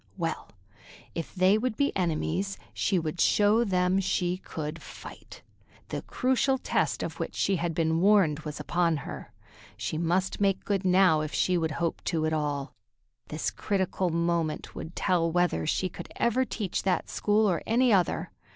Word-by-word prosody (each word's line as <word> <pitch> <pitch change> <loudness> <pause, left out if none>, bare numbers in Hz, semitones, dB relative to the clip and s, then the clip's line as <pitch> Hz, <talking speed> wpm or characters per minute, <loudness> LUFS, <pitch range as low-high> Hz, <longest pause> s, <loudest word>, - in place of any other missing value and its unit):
Well, 165 -3 -3 0.6
if 165 +3 -5
they 190 +3 +4
would 240 -1 -2
be 280 - +1
enemies, 180 +2 -1 0.2
she 195 - +1
would 160 0 -2
show 210 +3 +4
them 185 -2 +2
she 180 -1 0
could 155 -3 -6
fight. - - -11 0.5
The - - -3
crucial 260 +1 +1
test - - 0
of - - -5
which - - -4
she 195 -1 +1
had 170 -1 -2
been 160 0 +1
warned 190 -7 +4
was 150 -2 -6
upon 170 -2 +1
her. - - -8 0.5
She 110 +9 -3
must 180 +4 0
make 195 -1 +1
good 200 -2 0
now 185 -4 +4
if 155 0 -4
she 185 - +2
would 160 -2 0
hope 170 -1 -2
to 160 -3 0
at 155 - 0
all. 145 -2 -2 0.5
This 155 0 -2
critical 190 -2 -1
moment 170 -1 -1
would 160 - -8
tell 165 -2 +1
whether 175 - +1
she 185 - +1
could 170 - -9
ever 250 +3 +2
teach 205 -7 -3
that 190 -2 0
school 215 +1 +2
or 175 -4 +1
any 240 +1 +4
other. 180 -4 +1
180 Hz, 170 wpm, -28 LUFS, 160-195 Hz, 0.6 s, they